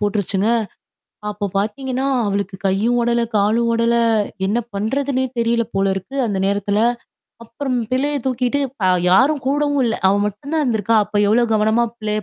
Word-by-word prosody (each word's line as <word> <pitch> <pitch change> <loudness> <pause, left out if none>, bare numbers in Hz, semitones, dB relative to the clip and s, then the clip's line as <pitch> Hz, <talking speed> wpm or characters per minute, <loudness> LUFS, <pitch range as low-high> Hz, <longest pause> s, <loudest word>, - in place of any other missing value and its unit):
போட்டுருச்சுங்க. 205 0 0 0.8
அப்ப 205 -1 -4
பார்த்தீங்கன்னா, 260 +6 -2 0.2
அவளுக்கு 200 -1 -2
கையும் 205 +6 +1
ஓடல, 235 0 +1 0.2
காலும் 220 +4 +2
ஓடல 230 0 +2 0.5
என்ன 210 +4 +1 0.2
பண்றதுன்னே 260 +6 -1
தெரியல 235 0 +1
போல 195 0 +1
இருக்கு. 195 +9 -7
அந்த 200 -3 -2
நேரத்தில. 200 +1 0 0.6
அப்புறம் 255 +3 -3
பிள்ளைய 285 +3 0
தூக்கிட்டு 255 +2 0 0.2
ப - - 0 0.3
யாரும் 270 +9 +4
கூடவும் 285 0 +1
இல்ல. 225 -2 0
அவ 195 - +3
மட்டும் 210 +9 -6
தான் 315 - +2
இருந்திருக்கா. 225 -3 +1
அப்ப 210 +1 -5
எவ்வளோ 225 +4 +3
கவனமா 220 +2 +2
பிள்ளைய 215 0 -2
230 Hz, 145 wpm, -19 LUFS, 205-260 Hz, 0.8 s, யாரும்